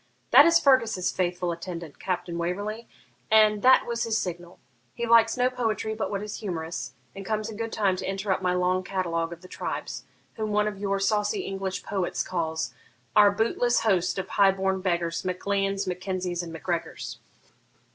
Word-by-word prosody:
'That 285 Hz, +5 st, +9 dB
is 335 Hz, 0 st, +6 dB
Fergus's 230 Hz, -, +3 dB
faithful 180 Hz, -1 st, -1 dB
attendant, 170 Hz, -2 st, -7 dB
Captain 180 Hz, -2 st, -3 dB
Waverley, 205 Hz, +6 st, -3 dB, 0.4 s
and 215 Hz, -1 st, +5 dB
that 260 Hz, +1 st, +6 dB
was 235 Hz, 0 st, -2 dB
his 225 Hz, -1 st, 0 dB
signal. 175 Hz, -2 st, -5 dB, 0.4 s
He 235 Hz, -, -2 dB
likes 230 Hz, 0 st, +5 dB
no 250 Hz, 0 st, +3 dB
poetry 225 Hz, -3 st, -1 dB
but 215 Hz, -2 st, -3 dB
what 200 Hz, 0 st, -3 dB
is 210 Hz, 0 st, -5 dB
humorous, 165 Hz, -7 st, -4 dB, 0.2 s
and 195 Hz, -, -7 dB
comes 215 Hz, +2 st, -2 dB
in -, -, -8 dB
good 225 Hz, +1 st, -4 dB
time 195 Hz, -3 st, +1 dB
to -, -, -4 dB
interrupt 195 Hz, -1 st, -1 dB
my 180 Hz, -1 st, +1 dB
long 180 Hz, +1 st, +1 dB
catalogue 170 Hz, -3 st, -2 dB
of 170 Hz, 0 st, -9 dB
the 185 Hz, -, -12 dB
tribes, -, -, -5 dB, 0.3 s
whom 215 Hz, -1 st, -2 dB
one 210 Hz, 0 st, +2 dB
of 205 Hz, -2 st, -4 dB
your 200 Hz, -1 st, 0 dB
saucy 210 Hz, -, +1 dB
English 195 Hz, -, -4 dB
poets 190 Hz, -3 st, -2 dB
calls 160 Hz, -3 st, -2 dB, 0.4 s
Our 210 Hz, -1 st, +8 dB
bootless 230 Hz, +3 st, +1 dB
host 185 Hz, -5 st, +1 dB
of 190 Hz, 0 st, -3 dB
high 195 Hz, 0 st, +4 dB
born 190 Hz, 0 st, -1 dB
beggars, 170 Hz, -3 st, -1 dB
Mac 180 Hz, -1 st, -4 dB
Leans, 195 Hz, 0 st, 0 dB
Mac 180 Hz, -1 st, -3 dB
Kenzies, 185 Hz, -2 st, -2 dB
and 170 Hz, -1 st, -7 dB
Mac 160 Hz, -, -9 dB
Gregors.' 170 Hz, -2 st, -3 dB
195 Hz, 185 wpm, -26 LUFS, 180-215 Hz, 0.4 s, That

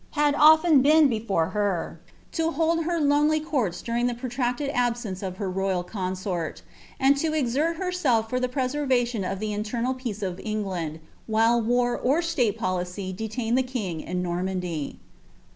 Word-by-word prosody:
had 295 Hz, -1 st, +3 dB
often 310 Hz, 0 st, +6 dB
been 305 Hz, +2 st, +6 dB
before 215 Hz, -9 st, 0 dB
her, 200 Hz, -3 st, -2 dB, 0.3 s
to 325 Hz, -1 st, 0 dB
hold 330 Hz, +1 st, +1 dB
her 340 Hz, 0 st, 0 dB
lonely 295 Hz, +1 st, +3 dB
courts 250 Hz, -, -2 dB
during 240 Hz, +1 st, 0 dB
iha 240 Hz, -, -4 dB
pro 255 Hz, +2 st, -5 dB
tracted 250 Hz, +3 st, -1 dB
abaence 240 Hz, -6 st, -1 dB
of 185 Hz, -2 st, -5 dB
her 200 Hz, -, -3 dB
royal 190 Hz, -1 st, -1 dB
consort, 185 Hz, -3 st, -4 dB, 0.4 s
and 275 Hz, +1 st, +5 dB
to 310 Hz, +2 st, 0 dB
exert 295 Hz, +4 st, +1 dB
herself 320 Hz, -11 st, 0 dB
fur 250 Hz, +3 st, -1 dB
the 255 Hz, 0 st, -1 dB
p» 265 Hz, +2 st, -2 dB
wrvaiioa 250 Hz, -7 st, 0 dB
of 195 Hz, -, -4 dB
the 215 Hz, 0 st, -2 dB
internal 230 Hz, +4 st, -1 dB
peace 235 Hz, -5 st, -5 dB
of 185 Hz, -1 st, -3 dB
England, 190 Hz, -8 st, -3 dB, 0.3 s
while 225 Hz, +2 st, +3 dB
war 245 Hz, +1 st, +1 dB
or 275 Hz, +6 st, +1 dB
■tale 265 Hz, -11 st, 0 dB
polii^ 185 Hz, +1 st, -3 dB
detained 225 Hz, +3 st, -2 dB
the 260 Hz, -, +4 dB
king 215 Hz, -11 st, -4 dB
in 180 Hz, 0 st, -3 dB
Normandy. 180 Hz, -3 st, -3 dB
235 Hz, 165 wpm, -25 LUFS, 190-280 Hz, 0.4 s, often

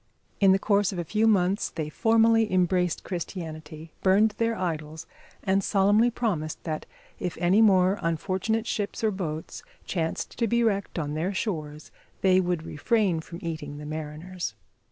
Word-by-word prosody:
In 195 Hz, -2 st, +6 dB
the 190 Hz, -, +5 dB
course 200 Hz, 0 st, +2 dB
of 190 Hz, -, -6 dB
a 175 Hz, -, -1 dB
few 215 Hz, +7 st, +1 dB
months 195 Hz, -1 st, +2 dB
they 155 Hz, -2 st, -4 dB
formally 225 Hz, +4 st, +3 dB
embraced 180 Hz, -1 st, +1 dB
Christianity, 160 Hz, -3 st, -6 dB
burned 200 Hz, +3 st, +4 dB
their 230 Hz, 0 st, +1 dB
idols, 160 Hz, -3 st, -4 dB, 0.4 s
and 195 Hz, +1 st, +2 dB
solemnly 205 Hz, +4 st, +4 dB
promised 195 Hz, -11 st, -2 dB
that 155 Hz, -2 st, -4 dB, 0.3 s
if 180 Hz, -2 st, -3 dB
any 180 Hz, +5 st, +4 dB
more 190 Hz, -2 st, +4 dB
unfortunate 190 Hz, +7 st, -1 dB
ships 205 Hz, -1 st, -3 dB
or 220 Hz, -, +3 dB
boats 160 Hz, -5 st, -5 dB, 0.2 s
chanced 165 Hz, +3 st, -3 dB
to 230 Hz, -, +2 dB
be 235 Hz, +2 st, +2 dB
wrecked 200 Hz, -5 st, 0 dB
on 150 Hz, -3 st, -2 dB
their 175 Hz, +6 st, -2 dB
shores 155 Hz, -8 st, -4 dB, 0.3 s
they 185 Hz, -1 st, +5 dB
would 175 Hz, -3 st, -1 dB
refrain 195 Hz, +1 st, +1 dB
from 170 Hz, +1 st, -9 dB
eating 155 Hz, -3 st, -5 dB
the 150 Hz, -, -8 dB
mariners. 155 Hz, -, -5 dB
185 Hz, 155 wpm, -26 LUFS, 160-205 Hz, 0.4 s, In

